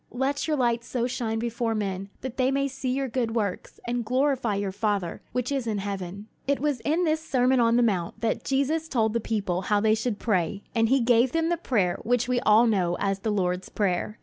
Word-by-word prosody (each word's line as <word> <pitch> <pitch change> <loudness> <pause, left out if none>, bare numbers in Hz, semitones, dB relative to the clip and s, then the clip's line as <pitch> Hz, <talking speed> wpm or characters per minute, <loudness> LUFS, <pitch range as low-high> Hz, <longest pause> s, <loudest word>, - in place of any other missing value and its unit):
Let 270 +4 -1
your 305 -1 +1
light 235 -2 +1
so 240 0 -2
shine 235 -2 -2
before 230 0 -1
men, 195 -2 -3
that 260 -1 -6
they 255 -1 +3
may 275 +1 +1
see 270 -1 -4
your 270 +1 0
good 235 -2 -2
works, 205 -5 -3
and 240 0 -1
glorify 255 -2 +1
your 200 -1 -2
Father 200 -3 -2
which 250 +1 -2
is 270 -4 -1
in 215 -2 -1
heaven." 195 0 -5 0.2
It 280 0 +1
was 290 -2 0
in 315 +8 0
this 315 -1 +1
Sermon 260 -3 +2
on 230 -1 +4
the 245 - +4
Mount 195 -3 -1
that 225 -1 -1
Jesus 290 +4 0
told 220 -7 +1
the 235 - +1
people 200 -5 -1
how 205 +1 +1
they 215 +1 +3
should 225 -1 -1
pray, 195 -3 -1
and 225 -1 +2
he 270 0 +4
gave 240 +1 +3
them 330 0 +1
the 345 - +2
prayer 210 - 0
which 245 +1 +1
we 250 -1 +1
all 215 +2 +5
know 185 -6 +1
as 195 -1 0
the 220 - -2
Lord's 180 -2 -1
Prayer. 200 +1 -1
230 Hz, 225 wpm, -26 LUFS, 205-260 Hz, 0.2 s, all